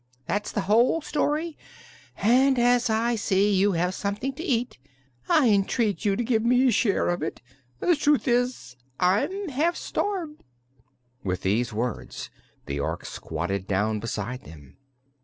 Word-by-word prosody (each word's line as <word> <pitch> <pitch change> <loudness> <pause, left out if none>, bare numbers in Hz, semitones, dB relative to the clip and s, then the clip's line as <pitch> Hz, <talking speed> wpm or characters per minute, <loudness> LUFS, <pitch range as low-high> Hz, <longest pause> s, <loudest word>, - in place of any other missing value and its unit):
That's 205 +1 -2
the 205 - -1
whole 230 +11 +3
story, 305 +1 -1 0.6
and 260 +5 +4
as 245 0 +3
I 225 +2 +1
see 205 -2 +2
you 195 +1 +3
have 180 +2 0
something 205 +8 -3
to 265 - -8
eat 245 - -1 0.5
I 285 -5 +5
entreat 205 +1 +1
you 200 -1 +3
to 240 - -1
give 225 -2 +1
me 250 +2 +4
a - - +4
share 205 -2 +2
of 175 0 -1
it. 160 - -4 0.4
The 350 - +3
truth 295 -1 +2
is, 245 - 0 0.2
I'm 330 - +1
half 310 +6 +1
starved." 350 -7 -3 0.8
With 90 -2 -2
these 110 +6 +1
words 115 +2 -4 0.3
the 70 +1 -3
Ork 70 - -3
squatted 90 +4 -4
down 105 +2 0
beside 115 +3 -4
them. 75 -4 -14
215 Hz, 150 wpm, -25 LUFS, -, 0.8 s, I